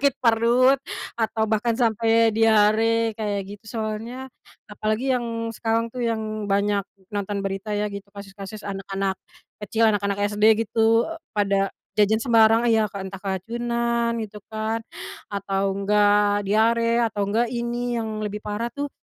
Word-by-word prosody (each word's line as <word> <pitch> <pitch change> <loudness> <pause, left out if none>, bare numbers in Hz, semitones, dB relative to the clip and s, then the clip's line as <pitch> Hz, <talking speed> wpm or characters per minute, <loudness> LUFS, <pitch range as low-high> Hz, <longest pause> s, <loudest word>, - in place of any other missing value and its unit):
sakit 280 -2 +2
perut 235 +3 +4 0.4
atau 220 -1 0
bahkan 225 +2 0
sampai 225 -1 +3
diare, 225 +1 +3
kayak 205 -3 -3
gitu, 205 +2 -10 0.2
soalnya 225 +4 -4 0.4
apalagi 215 +5 -1
yang 230 -2 -3
sekarang, 230 +1 0
tuh, 250 - -3
yang 215 -2 -2
banyak 200 0 +2 0.3
nonton 205 0 -2
berita, 195 +2 -4
ya, 210 - 0
gitu, 200 0 -9
kasus-kasus 200 +1 -9
anak-anak 195 -1 -2 0.5
kecil, 225 +2 +2
anak-anak 200 -2 +1 0.2
SD, 220 +2 +4
gitu, 225 +3 +3 0.2
pada 195 -1 +1 0.3
jajan 215 +1 +3
sembarang, 225 -2 +5
ya, 220 -3 +3
kan, 195 -1 -5
entah 195 - -8
keracunan, 235 +4 -1
gitu, 215 -1 -7 0.2
kan, 220 +1 -2 0.5
atau 195 0 -1
enggak 205 +1 +3
diare, 230 +3 +2
atau 205 -2 -2
enggak 225 +4 +1
ini 240 0 -2
yang 220 -2 -3
lebih 210 0 -5
parah, 210 +3 -2
tuh, 285 +4 -5
220 Hz, 140 wpm, -24 LUFS, 205-230 Hz, 0.5 s, sembarang